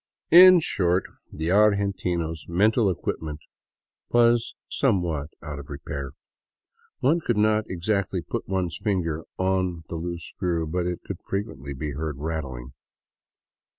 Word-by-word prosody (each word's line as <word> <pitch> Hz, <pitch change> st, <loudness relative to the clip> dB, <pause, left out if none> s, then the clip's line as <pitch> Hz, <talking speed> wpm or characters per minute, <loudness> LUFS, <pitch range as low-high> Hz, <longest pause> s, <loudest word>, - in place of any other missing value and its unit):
In 180 Hz, 0 st, +10 dB
short 90 Hz, -, +1 dB, 0.3 s
the 80 Hz, +3 st, -2 dB
argentino's 95 Hz, -6 st, +1 dB
mental 105 Hz, +5 st, +3 dB
equipment 80 Hz, -3 st, -3 dB, 0.7 s
was 120 Hz, -1 st, +3 dB
somewhat 85 Hz, -, 0 dB
out 75 Hz, -2 st, -6 dB
of 70 Hz, -, -11 dB
re 70 Hz, -, -5 dB
pair. 70 Hz, -2 st, -6 dB, 0.9 s
One 155 Hz, +7 st, +3 dB
could 120 Hz, -9 st, -1 dB
not 110 Hz, 0 st, +3 dB
exactly 95 Hz, 0 st, -1 dB
put -, -, -4 dB
one's 95 Hz, -3 st, -1 dB
finger 85 Hz, -7 st, -1 dB
on 95 Hz, -3 st, 0 dB
the 85 Hz, -, -4 dB
loose 85 Hz, 0 st, -5 dB
screw, 85 Hz, -4 st, -2 dB
but 85 Hz, +3 st, -1 dB
it 90 Hz, -1 st, -3 dB
could -, -, -6 dB
frequently 70 Hz, -, -4 dB
be 75 Hz, +3 st, -4 dB
heard 75 Hz, 0 st, -4 dB
rattling. 70 Hz, -5 st, -5 dB
90 Hz, 130 wpm, -25 LUFS, 80-100 Hz, 0.9 s, In